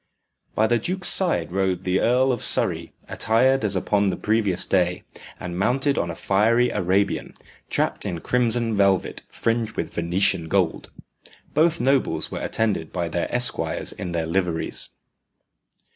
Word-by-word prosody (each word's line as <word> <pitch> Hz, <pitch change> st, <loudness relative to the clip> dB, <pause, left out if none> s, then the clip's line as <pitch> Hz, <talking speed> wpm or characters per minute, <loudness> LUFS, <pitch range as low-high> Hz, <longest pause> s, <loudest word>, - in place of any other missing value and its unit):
By 110 Hz, -, +3 dB
the 120 Hz, +1 st, +2 dB
duke's 185 Hz, -, -1 dB
side 125 Hz, -, 0 dB
rode 95 Hz, -1 st, -1 dB
the 90 Hz, +1 st, +1 dB
Earl 130 Hz, +3 st, +3 dB
of 120 Hz, -, -2 dB
Surrey -, -, +2 dB, 0.2 s
attired 130 Hz, +4 st, +2 dB
as 100 Hz, -2 st, +1 dB
upon 100 Hz, +2 st, +1 dB
the 95 Hz, -, -1 dB
previous 105 Hz, -4 st, +1 dB
day, 90 Hz, -2 st, 0 dB, 0.4 s
and 90 Hz, 0 st, -5 dB
mounted 135 Hz, +7 st, +1 dB
on 85 Hz, -, -1 dB
a 85 Hz, -, -5 dB
fiery 115 Hz, +7 st, +2 dB
Arabian, 95 Hz, +3 st, 0 dB, 0.3 s
trapped -, -, -1 dB
in 85 Hz, -, -4 dB
crimson 120 Hz, +1 st, +1 dB
velvet 100 Hz, -2 st, +1 dB
fringed 115 Hz, -1 st, -2 dB
with -, -, -3 dB
Venetian 85 Hz, 0 st, 0 dB
gold. 90 Hz, -2 st, 0 dB, 0.6 s
Both 165 Hz, +1 st, +2 dB
nobles 135 Hz, 0 st, 0 dB
were -, -, -5 dB
attended 105 Hz, -8 st, -1 dB
by 85 Hz, -2 st, -2 dB
their 85 Hz, +1 st, -2 dB
esquires 120 Hz, -1 st, 0 dB
in 90 Hz, -, -6 dB
their 85 Hz, -1 st, -1 dB
liveries. 85 Hz, -1 st, -2 dB
100 Hz, 145 wpm, -23 LUFS, 90-120 Hz, 0.6 s, By